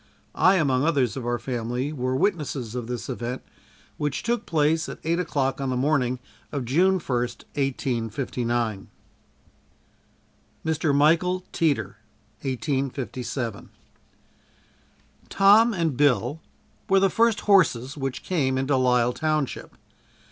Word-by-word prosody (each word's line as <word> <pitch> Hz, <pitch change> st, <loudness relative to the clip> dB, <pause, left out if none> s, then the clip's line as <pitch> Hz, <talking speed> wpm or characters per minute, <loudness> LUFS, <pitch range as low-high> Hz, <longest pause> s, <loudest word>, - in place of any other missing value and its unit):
I 185 Hz, +1 st, +4 dB
among 135 Hz, -7 st, +2 dB
others 140 Hz, -9 st, +1 dB
of 125 Hz, -3 st, -5 dB
our 120 Hz, 0 st, 0 dB
family 125 Hz, +3 st, -3 dB
were 130 Hz, -2 st, -1 dB
witnesses 140 Hz, -, -1 dB
of 125 Hz, -2 st, -4 dB
this 125 Hz, -1 st, -4 dB
event, 125 Hz, 0 st, -4 dB, 0.5 s
which 145 Hz, -2 st, -2 dB
took 235 Hz, +1 st, -1 dB
place 160 Hz, +1 st, +1 dB
at -, -, -7 dB
eight 170 Hz, +2 st, 0 dB
o'clock 135 Hz, -6 st, -1 dB
on 135 Hz, -, -1 dB
the 130 Hz, -, -1 dB
morning 130 Hz, -2 st, +1 dB, 0.3 s
of 140 Hz, -4 st, -3 dB
June 180 Hz, +10 st, +3 dB
first, 125 Hz, -7 st, -3 dB
1859. 120 Hz, -4 st, -2 dB, 1.8 s
Mr. 160 Hz, -2 st, +1 dB
Michael 170 Hz, +5 st, +3 dB
Teeter 110 Hz, -, 0 dB, 0.4 s
1857. 130 Hz, -3 st, -3 dB, 1.6 s
Tom 210 Hz, +4 st, +6 dB
and 165 Hz, -, -1 dB
Bill 140 Hz, +1 st, +2 dB, 0.5 s
were 195 Hz, 0 st, +5 dB
the 195 Hz, -, +4 dB
first 230 Hz, -1 st, +2 dB
horses 145 Hz, -, +3 dB
which 135 Hz, -3 st, -4 dB
came 135 Hz, -8 st, 0 dB
into 135 Hz, +1 st, +1 dB
Lyle 125 Hz, -1 st, +3 dB
township. 155 Hz, -2 st, -2 dB
135 Hz, 120 wpm, -25 LUFS, 125-160 Hz, 1.8 s, Tom